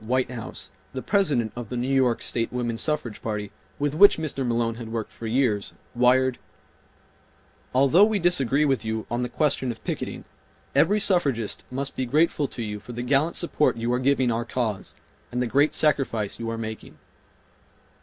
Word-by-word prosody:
Whitehouse, 125 0 -3 0.2
the 130 - -5
President 145 - +1
of 120 -3 -6
the 125 - -3
New 120 +1 -1
York 130 -3 +2
State 115 -1 -1
Woman 120 -2 -2
Suffrage 150 -8 -2
Party, 105 -2 -4 0.3
with 145 0 -1
which 200 +6 +7
Mr. 155 -4 -2
Malone 115 -1 0
had 115 -2 -7
worked 115 -2 -3
for 115 - -7
years, 110 -4 +1 0.2
wired: 125 +1 +3 1.3
"Although 140 +9 +5
we 215 -1 +1
disagree 150 -6 +2
with 135 -5 +1
you 110 0 -3
on 120 +1 0
the 125 - -2
question 140 -2 0
of 115 - -6
picketing - - -4 0.5
every 210 +2 +4
suffragist 140 - 0
must 135 +2 -4
be 130 - -2
grateful 150 +1 +2
to 120 - -5
you 105 -1 -4
for 120 - -10
the 120 +1 -4
gallant 140 +6 +2
support 155 -7 +1
you 115 +1 -1
are 125 - +1
giving 130 -2 +2
our 115 +1 -1
cause 115 -4 -3 0.4
and 125 - -2
the 125 - +1
great 140 +6 +3
sacrifice 130 -9 0
you 115 -1 -3
are 115 - -3
making." 110 -1 -7
125 Hz, 175 wpm, -25 LUFS, 115-140 Hz, 1.3 s, which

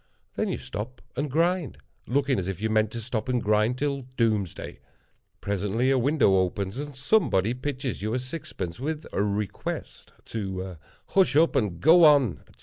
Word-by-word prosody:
Then - - -1
you - - -1
stop 120 +5 -6 0.2
and 145 +3 -2
grind; 165 - +1 0.3
looking 135 0 +1
as 90 - -3
if 95 -3 -4
you 110 +1 -1
meant 110 -1 +3
to 120 - -4
stop 115 +1 -3
and 125 -1 +2
grind 110 +3 +2
till 140 0 -1 0.2
doomsday. 110 -7 -1 0.6
Presently 105 +6 0
a 135 - +3
window 125 -7 +3
opens, 95 +1 -1
and 145 0 -5
somebody 135 - +2
pitches 130 -2 -4
you 110 +3 -1
a - - +2
sixpence, 125 - -5
with 150 +3 -3
a - - +1
request 105 -1 -3
to 95 -4 -4 0.3
"Hush 190 -7 +3
up 165 +2 +4
and 100 -9 0
go 165 - +7
on," 140 - +5
etc. - - -22
120 Hz, 170 wpm, -26 LUFS, 100-140 Hz, 0.6 s, go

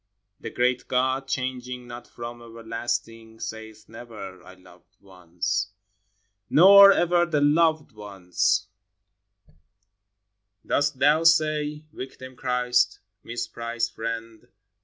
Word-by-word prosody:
The - - -7
great 125 0 0
God, 130 +1 0
changing 125 -1 -4
not 120 0 -10
from 120 0 -9
everlasting, 115 0 -5
Saith 110 -1 -8
never, 110 -5 -10
Ci 90 - -21
I 95 - -13
loved 90 -1 -21
once." 95 +1 -4 0.8
Nor 200 +4 +9
ever 175 -2 +2
the 155 -3 0
"Loved 155 +1 +2
Once" 95 -3 -1 2.0
Dost 145 -1 0
Thou 150 +4 +3
say, 155 -2 +2
Victim 130 0 -9
Christ, 125 -4 0 0.2
misprized 115 0 -4
friend. 115 -1 -6
120 Hz, 100 wpm, -25 LUFS, 110-140 Hz, 2.0 s, Nor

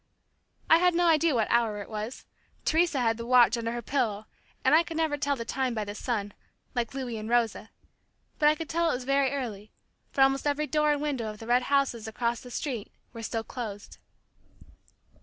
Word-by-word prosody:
I 325 - +7
had 360 -1 +3
no 350 +1 +3
idea 325 -3 +4
what 225 -2 +2
hour 230 -3 +2
it 200 - -7
was. 215 +3 -6 0.4
Teresa 320 -4 +2
had 225 -2 +1
the 230 - -6
watch 245 -1 +6
under 230 -1 -2
her 240 0 -4
pillow, 215 -5 -1 0.4
and - - +5
I 320 - +7
could 330 -1 -6
never 320 -2 +1
tell 285 -1 0
the 230 -3 -6
time 260 -1 -1
by 215 - -1
the 205 - -5
sun, 210 -3 -3 0.4
like 240 +1 -2
Louis 250 -4 -4
and 215 +1 -6
Rosa, 230 -2 +1 0.7
but 300 - +6
I 305 - +3
could 320 +1 -6
tell 335 +1 +1
it - - +1
was 250 - -5
very 275 +1 +2
early, 220 -7 -5 0.4
for 275 - 0
almost 270 +1 +3
every 290 +1 +1
door 300 0 +2
and 295 0 -1
window 270 -7 -2
of 210 - -8
the 225 - -10
red 245 +2 +3
houses 275 -6 +1
across 235 +1 -1
the 250 - -11
street, 245 -4 -4 0.2
were 230 - -7
still 225 0 -3
closed. 215 -5 -7
250 Hz, 210 wpm, -28 LUFS, 225-290 Hz, 0.7 s, I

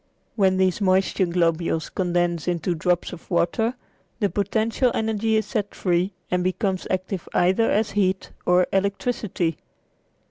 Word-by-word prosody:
When 190 -3 +3
these 190 +1 +1
moisture 190 -1 +2
globules 170 -1 0
condense 175 -2 0
into 175 0 0
drops 175 +2 0
of 175 - -11
water 185 +7 +1 0.4
the 205 -4 +1
potential 220 +5 +1
energy 220 0 0
is 220 - +1
set 205 -4 -3
free 180 +1 0 0.2
and 180 0 +1
becomes 185 +1 -1
active 185 0 -3
either 190 +6 +3
as 215 +1 +1
heat 190 -2 0 0.2
or 180 0 +5
electricity. 195 -3 -1
185 Hz, 135 wpm, -24 LUFS, 175-205 Hz, 0.4 s, or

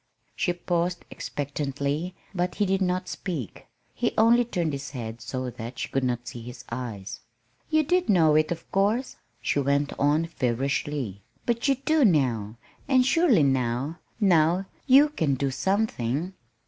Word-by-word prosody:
She 175 - 0
paused 175 0 -1
expectantly, 145 +4 -3 0.2
but 180 -1 -1
he 210 - +1
did 195 0 +1
not 180 0 0
speak. 150 - -5 0.3
He - - -1
only 235 +2 +5
turned 175 -9 -2
his 140 0 -5
head 115 -4 -6
so 130 +1 -4
that 115 +2 -8
she - - -3
could 135 - 0
not 120 -1 -1
see 120 - -7
his 125 +2 -10
eyes. 115 -5 -5 0.5
"You 310 -1 +3
did 360 +4 +1
not - - +6
know 160 -3 +5
it, 155 +1 +3
of 165 -1 -5
course," 210 +7 +1 0.3
she - - +1
went 140 +1 +1
on 150 +3 +3
feverishly. 135 - -2 0.2
"But 235 +2 0
you 275 - +4
do 300 +3 +2
now. 120 - +2 0.3
And 260 -2 +4
surely 270 - +4
now, 135 +3 0 0.2
now 180 -2 +3 0.2
you 280 +3 +7
can 160 - 0
do 135 +1 -1
something." 180 - -1
155 Hz, 160 wpm, -26 LUFS, 130-195 Hz, 0.5 s, you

